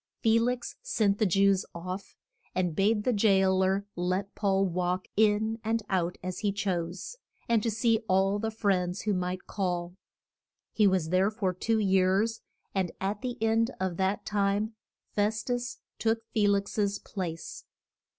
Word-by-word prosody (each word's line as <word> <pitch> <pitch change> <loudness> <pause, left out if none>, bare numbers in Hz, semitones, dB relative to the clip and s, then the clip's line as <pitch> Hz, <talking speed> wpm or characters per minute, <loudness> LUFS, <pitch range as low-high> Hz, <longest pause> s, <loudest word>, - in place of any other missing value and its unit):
] - - -45
Fe 225 0 +5
lix 245 +1 -1
sent 215 - +1
the 215 - +3
Jews 195 +1 +3
off, 185 +3 -6 0.4
and 180 -3 0
bade 210 +3 +2
the 250 - +2
jail 190 -3 +4
er 195 +1 +1
let 185 +3 -1
Paul 195 -1 +2
walk 180 0 -1
in 220 +1 +2
and 225 0 0
out 180 -2 0
as 185 0 -4
he 205 -2 +1
chose, 185 - -3 0.3
and 230 -3 +2
see 225 +1 +2
all 195 +2 +3
the 225 +1 -1
friends 195 -4 0
who 210 - 0
might 180 0 -2
call. 175 -3 -2 0.8
He 210 -2 +4
was 185 -4 +1
there 185 +3 +3
for 205 -4 -1
two 225 +5 0
years, 195 +2 +2 0.3
and 185 -3 0
at 200 +2 -2
the 245 -1 -3
end 225 +1 +3
of 185 -2 -2
that 195 +2 0
time 205 +2 0 0.4
Fes 210 +1 +1
tus 245 0 -2 0.2
took 225 0 +1
Fe 210 -2 +3
lix's 200 0 +1
place. 170 -5 -6
200 Hz, 160 wpm, -29 LUFS, 185-220 Hz, 0.8 s, Fe